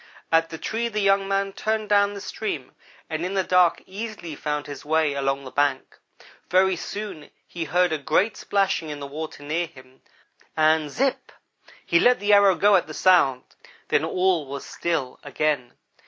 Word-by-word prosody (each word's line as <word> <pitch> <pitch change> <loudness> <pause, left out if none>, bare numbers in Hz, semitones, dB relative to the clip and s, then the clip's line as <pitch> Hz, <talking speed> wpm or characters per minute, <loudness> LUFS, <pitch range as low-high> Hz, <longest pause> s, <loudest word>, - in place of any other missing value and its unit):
At 165 0 +3
the 160 - -7
tree 225 +7 -2
the 215 -2 -3
young 195 -1 +2
man 195 0 -1
turned 215 +1 -2
down 205 0 +3
the 200 - -7
stream 175 -14 -5 0.4
and 160 +1 -3
in 185 +2 -3
the 190 - +2
dark 180 -2 +3
easily 200 -4 -7
found 150 0 -3
his 145 -2 -8
way 155 -1 +1
along 135 0 -1
the 130 - -9
bank. 145 -2 -1 0.5
Very 185 +1 +3
soon 190 -3 -7 0.2
he 170 -2 -5
heard 180 +3 +2
a 155 - -1
great 175 +10 +1
splashing 195 -5 0
in 145 -1 -6
the 140 - -6
water 150 +1 -7
near 165 +4 -1
him, 130 -2 -18 0.6
and 155 -1 +3
zipp 265 - -1 0.6
he 170 - +3
let 250 +5 +4
the 205 +1 +2
arrow 200 -2 +6
go 205 +2 +4
at 175 - -2
the 155 - -8
sound 140 -9 +4 0.5
then 145 - +2
all 180 -2 +1
was 140 0 -6
still 155 -7 -3
again. 145 -3 -1
170 Hz, 180 wpm, -24 LUFS, 145-195 Hz, 0.6 s, arrow